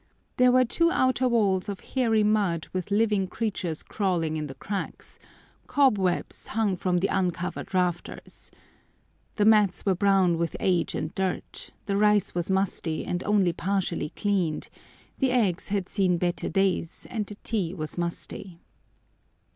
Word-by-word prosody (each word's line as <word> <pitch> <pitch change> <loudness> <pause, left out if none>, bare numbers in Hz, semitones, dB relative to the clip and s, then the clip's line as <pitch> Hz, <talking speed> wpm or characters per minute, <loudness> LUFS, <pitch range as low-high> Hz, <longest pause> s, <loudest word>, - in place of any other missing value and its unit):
There 250 0 +5
were 255 0 +5
two 335 +8 +2
outer 260 -4 +2
walls 205 -4 +2
of 200 - -5
hairy 225 -5 +3
mud 200 -7 +1
with 185 0 -3
living 205 -2 +2
creatures 185 -7 -3
crawling 175 -6 -1
in 155 -1 -3
the 135 - -9
cracks; 195 +7 -6 0.5
cobwebs 205 -11 +1
hung 215 -3 0
from 180 0 0
the 185 +3 +1
uncovered 180 -2 -2
rafters. 180 -2 -3 0.9
The 205 - +2
mats 210 -3 +4
were 195 - +3
brown 185 -3 +3
with 170 -1 -1
age 180 -3 +1
and 155 - -3
dirt, 190 -1 -3 0.2
the 200 -1 0
rice 210 -1 +3
was 175 0 -1
musty, 190 -4 0
and 180 +1 -2
only 200 -4 +3
partially 180 -4 -1
cleaned, 190 -7 -1 0.5
the 265 - +2
eggs 210 -8 +1
had 195 -2 -1
seen 185 -4 +1
better 175 0 -1
days, 190 -4 0
and 215 -3 -2
the 210 - -8
tea 195 -7 -1
was 155 -3 -5
musty. 175 +1 -4
190 Hz, 145 wpm, -26 LUFS, 175-210 Hz, 0.9 s, There